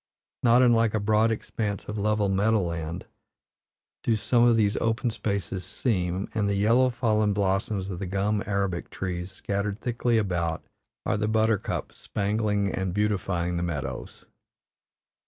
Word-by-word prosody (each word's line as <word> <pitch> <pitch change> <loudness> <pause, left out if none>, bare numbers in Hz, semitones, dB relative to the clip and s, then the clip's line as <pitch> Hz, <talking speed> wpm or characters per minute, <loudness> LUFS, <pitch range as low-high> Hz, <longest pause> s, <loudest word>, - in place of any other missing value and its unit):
Not 120 +1 +5
unlike 115 -3 +4
a - - +2
broad 110 +2 +3
expanse 105 -2 -3
of 105 - -4
level 105 0 +1
meadow 105 +3 +2
land 85 0 -4 1.0
do 115 - +2
some 120 +2 +2
of 120 - +5
these 105 -2 +2
open 115 +1 0
spaces 100 -4 -3
seem, 95 -2 -1
and 105 -2 0
the 100 - +1
yellow, 115 +6 +4
fallen 110 -4 +1
blossoms 95 0 0
of 90 - -5
the 95 - -4
gum 100 +3 0
arabic 100 -3 -1
trees, 90 0 -4
scattered 100 +2 -3
thickly 120 -1 0
about, 85 -6 -1 0.4
are - - +1
the 105 0 0
buttercups 110 -1 0
spangling 105 -1 -1
and 95 -1 -2
beautifying 95 -4 0
the - - -1
meadows. 85 -6 -5
105 Hz, 145 wpm, -26 LUFS, 95-110 Hz, 1.0 s, Not